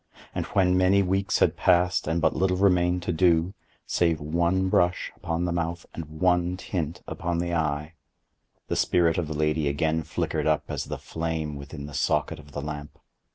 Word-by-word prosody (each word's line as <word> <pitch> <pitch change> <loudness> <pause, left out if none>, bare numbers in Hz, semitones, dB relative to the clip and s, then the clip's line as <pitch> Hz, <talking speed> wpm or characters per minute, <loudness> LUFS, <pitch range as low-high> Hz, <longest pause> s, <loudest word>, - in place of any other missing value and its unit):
And - - -3
when 90 -2 +2
many 95 +2 +4
weeks 95 +1 +1
had - - +3
passed, 90 -2 +2
and 80 +2 +1
but 85 - +2
little 95 -1 +1
remained 90 -2 +3
to 90 - -1
do, 85 +1 +3 0.3
save 85 -3 +1
one 85 +5 +1
brush 90 -1 +1
upon 85 0 -2
the 85 - -1
mouth 85 0 -2
and 85 - -5
one 90 0 +2
tint 85 -3 -4
upon 85 -3 -3
the 85 0 -1
eye, 75 -1 -1 0.7
the - - -1
spirit 85 -1 +2
of 85 - -2
the 75 -1 -4
lady 75 0 +1
again 80 +3 +1
flickered - - -2
up - - +2
as - - -3
the - - -5
flame 80 -2 -3
within 70 +1 -8
the 75 - -9
socket 75 +3 0
of 75 -1 -14
the 70 0 -5
lamp. 75 -1 -6
85 Hz, 185 wpm, -26 LUFS, 75-90 Hz, 0.7 s, many